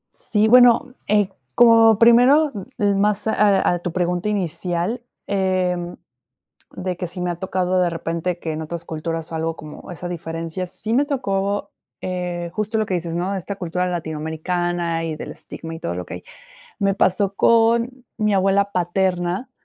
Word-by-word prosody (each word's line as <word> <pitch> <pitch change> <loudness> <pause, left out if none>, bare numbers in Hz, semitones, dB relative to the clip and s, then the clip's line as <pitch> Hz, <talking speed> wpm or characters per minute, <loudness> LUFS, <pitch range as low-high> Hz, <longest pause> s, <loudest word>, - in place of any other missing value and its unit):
Sí, 215 -1 +1
bueno, 245 +1 +6
eh, 205 -2 +3 0.3
como 225 -2 +6
primero, 250 +6 +6 0.2
eh, 205 -1 +2
más 205 +1 +1
a 205 -2 +3
a 175 - 0
tu 175 0 -4
pregunta 180 +3 -1
inicial, 180 +3 -2 0.2
em, 185 -3 0 0.7
de 180 -1 -4
que, 180 - -3
si 180 +2 -8
me 180 - -1
ha 175 - -3
tocado 185 0 -1
de 175 - +1
repente 170 +1 -3
que 160 -2 -4
en 155 +1 -4
otras 170 +1 -6
culturas, 165 0 -4
o 165 - -6
algo 165 +1 -2
como 155 +2 -10
esa 175 +1 -6
diferencia, 165 +1 -4
sí 215 +5 -3
me 280 - +4
tocó, 200 -8 -1 0.3
eh, 180 -2 -3
justo 215 +1 -1
lo 215 - 0
que 185 - -2
dices, 170 -1 -3
¿no? 180 +3 -1
Esta 195 +2 -5
cultura 180 0 -2
latinoamericana, 170 +1 -2
y 160 -1 -3
del - - -7
estigma 165 0 -8
y 160 - -9
todo 85 - -3
lo 90 0 -5
que - - -7
hay. - - -9 0.5
Me 195 -1 +1
pasó 195 +1 +2
con 235 +3 +3
mi 210 -1 +1
abuela 195 +1 +2
paterna, 180 +4 -1
180 Hz, 170 wpm, -21 LUFS, 170-210 Hz, 0.7 s, bueno